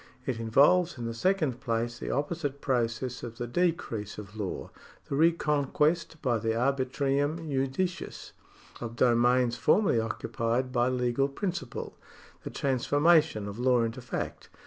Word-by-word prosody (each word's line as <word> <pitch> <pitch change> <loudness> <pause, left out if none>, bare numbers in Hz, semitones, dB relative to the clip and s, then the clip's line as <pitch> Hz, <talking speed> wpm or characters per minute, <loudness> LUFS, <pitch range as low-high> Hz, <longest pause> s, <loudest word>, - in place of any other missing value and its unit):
It 125 -4 -2
involves 145 +10 +4
in 120 - -5
the 115 - -3
second 155 -2 0
place 120 -1 -2
the - - -5
opposite 145 -1 -2
process 125 -1 -1
of 115 -1 -7
the 120 - -3
decrease 120 - -1
of 105 0 -9
law 105 -4 -4 0.2
— - - -26
the - - -2
reconquest 155 0 +2
by 120 -4 +1
the 110 +1 -1
arbitrium 140 +5 0
judicis 140 +6 -2 0.5
of 115 -1 -6
domains 120 0 +3
formerly 195 - +3
occupied 115 +3 -2
by 120 -1 +2
legal 125 +1 +1
principle 170 -4 -5 0.2
— - - -24
the - - -5
transformation 145 -2 +2
of 100 +3 -7
law 125 -1 +3
into 115 +2 -3
fact. 120 - -5
130 Hz, 145 wpm, -29 LUFS, 115-145 Hz, 0.5 s, involves